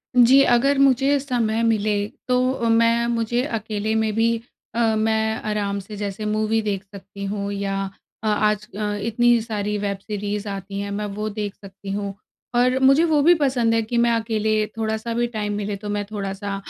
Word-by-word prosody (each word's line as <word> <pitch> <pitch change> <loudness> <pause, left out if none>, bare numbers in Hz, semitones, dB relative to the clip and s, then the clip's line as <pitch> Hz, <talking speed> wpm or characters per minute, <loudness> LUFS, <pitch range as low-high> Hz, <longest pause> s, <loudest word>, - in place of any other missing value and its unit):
जी, 250 +3 +7
अगर 270 +4 +3
मुझे 275 +1 +4
समय 235 -5 0
मिले, 210 -2 +1 0.2
तो 250 0 +2
अ, 235 -3 -1
मैं 230 +1 +3
मुझे 235 +1 0
अकेले 220 -4 -2
में 220 -1 +1
भी 230 +1 +3 0.4
अ, 235 - 0 0.2
मैं 220 0 +1
आराम 200 -1 -1
से 210 +2 -9
जैसे 205 +1 -4
मूवी 215 +1 +1
देख 205 -2 -2
सकती 200 0 -9
हूँ 200 0 -3
या 195 0 -2 0.4
अ, - - -1
आज 210 0 +1
अ, 210 -1 -1
इतनी 240 +1 +3
सारी 210 -2 -2
वेब 200 -1 -2
सीरीज़ 205 0 -4
आती 195 0 -5
हैं 200 0 -4
मैं 210 +1 -2
वो 215 0 -1
देख 205 -1 -4
सकती 195 0 -10
हूँ। 200 0 -3 0.4
और 250 +1 +3
मुझे 275 +5 +5
वो 310 -3 +3
भी 335 +5 +6
पसंद 255 -6 +1
है 225 - +3
कि 235 +2 -3
मैं 235 0 +4
अकेले 220 -1 +1
थोड़ा-सा 220 +1 -2
भी 240 +1 +1
टाइम 210 -3 -3
मिले 205 0 -3
तो 205 +1 -7
मैं 205 0 -1
थोड़ा-सा 200 -1 -4
215 Hz, 185 wpm, -22 LUFS, 205-235 Hz, 0.4 s, जी